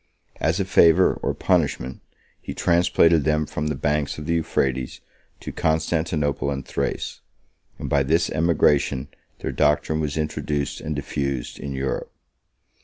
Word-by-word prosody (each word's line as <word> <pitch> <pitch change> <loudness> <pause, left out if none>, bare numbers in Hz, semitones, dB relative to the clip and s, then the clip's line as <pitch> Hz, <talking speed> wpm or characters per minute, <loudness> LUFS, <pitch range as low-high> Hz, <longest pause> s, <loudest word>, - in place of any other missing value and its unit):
As 80 +5 +1
a 100 - +1
favor, 85 -4 +5
or - - -1
punishment, 65 +2 0 0.4
he - - -7
transplanted 85 -2 +3
them 75 0 +1
from 75 +1 -3
the 75 - -1
banks 75 +2 -1
of 75 - -7
the 85 - 0
Euphrates 65 -6 -1 0.4
to - - -6
Constantinople 80 -2 0
and 70 -2 -3
Thrace; - - -3 0.6
and - - -5
by 70 - +2
this 80 +5 +2
emigration 75 -4 +2 0.3
their - - -2
doctrine 75 +1 +1
was 75 -1 -2
introduced 75 -2 -2
and 75 -1 -3
diffused 70 -3 -3
in 70 - -5
Europe. 65 0 -3
75 Hz, 140 wpm, -23 LUFS, 70-80 Hz, 0.6 s, favor